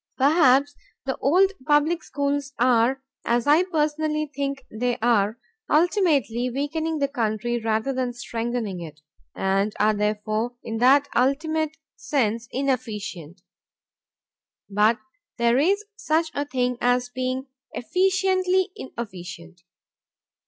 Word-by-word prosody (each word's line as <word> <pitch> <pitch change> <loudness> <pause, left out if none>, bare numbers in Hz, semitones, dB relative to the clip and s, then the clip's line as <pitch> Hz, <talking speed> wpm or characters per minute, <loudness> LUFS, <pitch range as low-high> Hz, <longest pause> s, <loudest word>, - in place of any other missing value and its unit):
Perhaps 285 -1 +4 0.3
the 265 - -1
old 370 +8 +3 0.2
public 300 +3 +3
schools 280 0 -2
are 250 +2 +3 0.2
(as 235 0 +1
I 300 +4 +5
personally 305 -2 -1
think 275 -1 -3
they 245 +2 -1
are) 220 -2 +2 0.3
ultimately 300 - +2
weakening 315 +5 -2
the 280 -1 +1
country 240 -2 -1
rather 220 +4 0
than 255 -1 -1
strengthening 235 -5 -4
it, 155 -2 -10 0.3
and 195 +2 0
are 215 +1 +4
therefore, 215 +3 -1
in 225 -1 -4
that 275 +4 +5
ultimate 310 +4 +1 0.2
sense, 230 -4 -1
inefficient. 210 - -3 1.3
But 210 +3 +3 0.4
there 235 +2 +3
is 400 +8 +2
such 325 -7 0
a 285 - -2
thing 250 -3 -1
as 245 0 +2
being 255 +1 -3 0.3
efficiently 370 - +1
inefficient. 180 -7 -8
255 Hz, 110 wpm, -24 LUFS, 225-300 Hz, 1.3 s, I